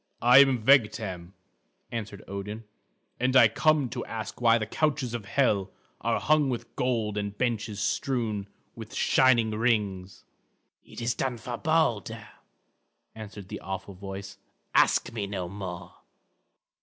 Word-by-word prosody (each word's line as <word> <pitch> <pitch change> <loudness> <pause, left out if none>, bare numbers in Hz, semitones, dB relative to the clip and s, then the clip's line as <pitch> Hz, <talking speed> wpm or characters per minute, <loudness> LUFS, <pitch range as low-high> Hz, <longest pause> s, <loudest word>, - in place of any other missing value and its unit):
"I 125 +3 +7
am 135 -2 +6
Vegtam," 105 -8 +2 0.6
answered 105 -4 -6
Odin, 100 +3 -6 0.6
"and 130 +1 +1
I 125 -3 +8
come 150 +5 +2
to 120 -1 -4
ask 110 +1 -6
why 115 -1 +5
the 110 - -2
couches 140 -1 -1
of 115 -4 -4
Hel 100 -5 +1 0.3
are - - 0
hung 155 -2 +3
with 120 -2 -5
gold 115 -5 -1
and 100 -1 -3
the - - -32
benches 110 -4 -2
strewn 110 -3 -1 0.3
with 110 -1 -10
shining 120 -4 +4
rings?" 105 -4 -1 0.6
"It - - -10
is 115 0 0
done 125 0 -2
for 120 +2 -5
Balder," 155 - 0 0.8
answered 105 -3 -10
the - - -6
awful 95 +1 -6
voice; 95 +1 -8 0.3
"ask - - +3
me 105 -3 -3
no 95 -3 -4
more." 90 -2 -7
110 Hz, 140 wpm, -27 LUFS, 100-125 Hz, 0.8 s, I